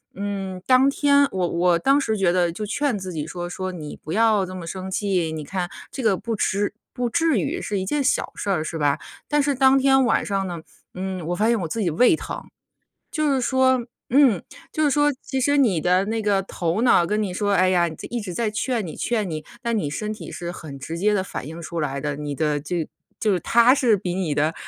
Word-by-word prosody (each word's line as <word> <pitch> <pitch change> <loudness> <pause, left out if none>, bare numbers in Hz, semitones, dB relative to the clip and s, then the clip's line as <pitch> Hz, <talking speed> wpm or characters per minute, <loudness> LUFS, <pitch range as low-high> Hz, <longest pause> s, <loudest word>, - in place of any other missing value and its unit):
嗯， 195 -2 -4
当 260 +1 +5
天 280 0 +4
我 185 -2 0
我 170 0 +2
当 275 +10 +4
时 220 -6 0
觉 190 -3 +3
得 175 -1 +2
就 210 +5 -5
劝 245 +2 0
自 185 -1 -6
己 150 -2 -3
说 175 +1 -5
说： 185 +1 -4
“你 155 -4 -7
不 155 - -9
要 215 -2 +3
这 185 - -8
么 180 -2 -7
生 190 +2 -5
气， 185 -5 0
你 155 -1 -5
看 180 +3 -3 0.2
这 270 - -5
个 215 -4 +3
不 230 +2 -3
痴 200 +1 0 0.2
不 245 -2 -1
至 325 -3 +2
于， - - -2
是 205 -2 -2
一 190 - -3
件 290 +7 0
小 - - +1
事 200 - -4
儿 175 -5 +1
是 160 +1 -4
吧？” 145 -2 +1 0.3
但 295 0 +2
是 285 0 +1
当 265 +1 +5
天 270 -1 +4
晚 230 - +2
上 195 -1 -1
呢， 170 -2 -5 0.3
嗯， 185 -2 -4
我 175 - -1
发 215 +3 +1
现 235 -2 +2
我 165 - -2
自 220 +8 -3
己 185 - +1
胃 245 - +4
疼。 - - -6 0.7
就 305 -2 +1
是 265 - +1
说 260 -1 +2 0.3
嗯， 255 - +5 0.3
就 310 - +1
是 290 - +3
说 290 +1 +3
其 265 -1 -3
实 285 +3 +2
你 225 - +3
的 180 +3 +3
那 220 +2 -2
个 200 -2 +2
头 175 +1 -2
脑 235 -8 +5
跟 210 +4 0
你 195 - -2
说， 205 +1 0
哎 185 -1 +4
呀， 175 -2 +3
在 160 - -9
一 240 -1 -2
直 190 -3 -6
在 225 +2 0
劝 220 -1 -1
你 155 - -7
劝 220 -5 -1
你， 155 -2 -5 0.2
那 235 - 0
你 205 -10 0
身 210 +8 -3
体 215 - -8
是 175 0 -5
很 150 -6 -9
直 160 +5 -6
接 210 +3 +2
地 190 -2 0
反 150 - -6
应 165 +2 -8
出 165 0 -4
来 140 -2 -2
的， 145 0 -2
你 145 -1 -4
的 150 -2 0
这 160 +2 -3 0.3
就 215 - +1
是 180 - -1
它 235 - +5
是 245 -7 +3
比 180 -1 -3
你 180 -5 -1
的 155 +3 +1
195 Hz, 260 characters per minute, -23 LUFS, 175-240 Hz, 0.7 s, 当